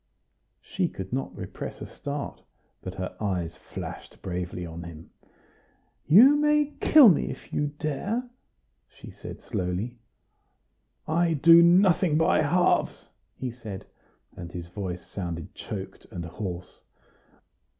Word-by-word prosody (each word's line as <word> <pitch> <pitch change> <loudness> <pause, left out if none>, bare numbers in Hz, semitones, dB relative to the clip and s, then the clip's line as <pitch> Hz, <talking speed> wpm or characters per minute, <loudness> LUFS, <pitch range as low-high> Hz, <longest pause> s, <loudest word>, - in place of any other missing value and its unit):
She 185 -2 -1
could 95 - -7
not 135 +1 -3
repress - - -7
a - - -6
start, 145 0 -6 0.4
but 95 0 -7
her 95 -1 -5
eyes 90 -5 -2
flashed - - -9
bravely 90 -1 -4
on 85 0 -7
him. 85 -1 -10 1.0
"You 240 - +8
may 300 0 +2
kill 300 -5 +8
me 180 - +4
if 135 - -9
you 145 - +1
dare," 200 - -2 0.6
she - - -12
said - - -10
slowly. 95 +7 -3 1.1
"I 165 +1 +2
do 165 +3 +8
nothing 175 -2 +5
by 160 - +3
halves," 170 +4 +1 0.3
he 130 -2 -3
said, 110 -5 -8 0.5
and 85 -2 -8
his 85 -1 -7
voice 90 -2 -5
sounded 85 -4 -6
choked 95 -2 -7
and 90 -6 -6
hoarse. 90 0 -7
120 Hz, 125 wpm, -27 LUFS, -, 1.1 s, You